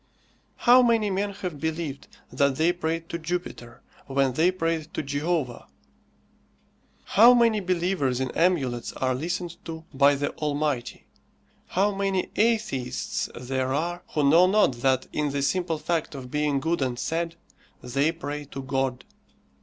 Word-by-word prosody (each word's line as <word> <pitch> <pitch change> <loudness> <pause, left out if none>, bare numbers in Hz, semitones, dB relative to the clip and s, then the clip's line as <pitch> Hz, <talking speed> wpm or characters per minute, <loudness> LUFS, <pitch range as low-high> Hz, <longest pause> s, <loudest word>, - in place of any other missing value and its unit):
How 245 +1 +6
many 230 -4 +2
men 200 +2 0
have 180 -6 -6
believed 160 -3 -4 0.3
that 140 -1 +2
they 165 +5 +2
prayed 165 -1 -3
to 170 - -4
Jupiter, 160 -8 -5 0.2
when 135 -1 +1
they 160 +7 +3
prayed 165 -3 -2
to - - -2
Jehovah! 145 -2 -2 1.4
How 235 +4 +6
many 230 -3 +4
believers 175 -8 0
in 130 -2 -2
amulets 135 -9 0
are 130 -1 0
listened 175 +5 -4
to 160 -1 -7
by 140 +1 +5
the 145 +1 -2
Almighty! 145 -4 -2 0.6
How 200 +3 +1
many 195 -1 -1
atheists 215 - 0
there 130 +1 -2
are 175 +4 -2
who 150 -2 +3
know 170 +5 +6
not 190 - +3
that, 130 +1 +1
in 150 -1 0
the 140 -1 -1
simple 175 +1 0
fact 160 -1 -2
of 125 -2 -8
being 150 -2 +1
good 165 +3 -1
and 125 -2 -1
sad, 165 +5 -2 0.5
they 140 +5 +1
pray 150 -3 -6
to 135 -1 -7
God! 130 -2 -2
155 Hz, 145 wpm, -26 LUFS, 135-175 Hz, 1.4 s, How